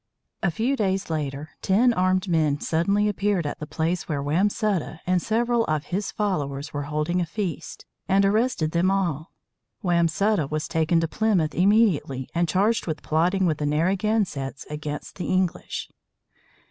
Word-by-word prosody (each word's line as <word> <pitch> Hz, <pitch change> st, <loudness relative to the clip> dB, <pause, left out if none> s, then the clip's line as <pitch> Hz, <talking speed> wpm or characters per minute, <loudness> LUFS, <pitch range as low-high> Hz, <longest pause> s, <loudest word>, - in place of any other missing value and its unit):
A 175 Hz, -, +2 dB
few 230 Hz, -, 0 dB
days 195 Hz, -6 st, -1 dB
later, 145 Hz, -1 st, -3 dB
ten 235 Hz, +6 st, +3 dB
armed 185 Hz, 0 st, +1 dB
men 155 Hz, -4 st, +2 dB
suddenly 200 Hz, +8 st, +1 dB
appeared 205 Hz, -4 st, 0 dB
at 145 Hz, -, -4 dB
the 150 Hz, -, -6 dB
place 165 Hz, +3 st, -2 dB
where 145 Hz, -3 st, -1 dB
Wamsutta 180 Hz, +3 st, 0 dB
and 180 Hz, -1 st, +2 dB
several 235 Hz, +3 st, +1 dB
of 155 Hz, -1 st, -1 dB
his 195 Hz, +2 st, -1 dB
followers 145 Hz, -8 st, -2 dB
were 145 Hz, -1 st, -3 dB
holding 155 Hz, +4 st, 0 dB
a -, -, 0 dB
feast, 185 Hz, -1 st, -5 dB, 0.2 s
and 195 Hz, +1 st, +4 dB
arrested 210 Hz, -6 st, +1 dB
them 175 Hz, +3 st, +2 dB
all. 175 Hz, -5 st, -1 dB, 0.5 s
Wamsutta 170 Hz, 0 st, +2 dB
was 155 Hz, 0 st, -2 dB
taken 160 Hz, +1 st, +2 dB
to 165 Hz, -, 0 dB
Plymouth 180 Hz, -5 st, +1 dB
immediately, 180 Hz, -, +2 dB
and 170 Hz, -1 st, +1 dB
charged 205 Hz, +7 st, +1 dB
with 155 Hz, -2 st, -3 dB
plotting 180 Hz, +5 st, +2 dB
with 155 Hz, -4 st, 0 dB
the 150 Hz, -, 0 dB
Narragansetts 170 Hz, -3 st, 0 dB
against 150 Hz, -1 st, -6 dB
the 180 Hz, -, -4 dB
English. 185 Hz, -2 st, -1 dB
175 Hz, 155 wpm, -24 LUFS, 155-200 Hz, 0.5 s, and